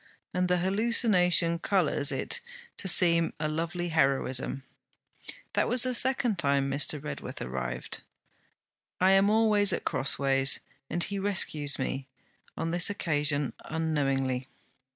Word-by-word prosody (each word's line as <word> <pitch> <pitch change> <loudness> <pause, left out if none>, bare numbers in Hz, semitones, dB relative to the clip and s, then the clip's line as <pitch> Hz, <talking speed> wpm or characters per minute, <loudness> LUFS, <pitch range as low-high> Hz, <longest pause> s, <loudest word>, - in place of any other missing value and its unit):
And 180 0 -1
the 180 0 +1
hallucination 185 -4 +2
colours 165 -6 0
it - - -1 0.4
to - - -5
seem 170 -2 +4
a 155 - -2
lovely 170 +3 -4
heroism. 135 -3 0 0.9
That - - 0
was 245 -1 +7
the 255 0 +1
second 245 -5 +3
time 140 -2 0
Mr. 145 +2 0
Redworth 150 +2 -8
arrived. 65 0 -5 1.0
I 185 +1 +3
am 195 +1 +3
always 215 -2 +3
at - - -3
crossways, 135 0 +1 0.3
and 175 - -2
he 200 -1 -4
rescues 155 -7 0
me; 135 0 -5 0.5
on 165 - -3
this 175 +2 +4
occasion 145 -7 -1
unknowingly.' 135 -5 -2
165 Hz, 125 wpm, -27 LUFS, 140-190 Hz, 1.0 s, was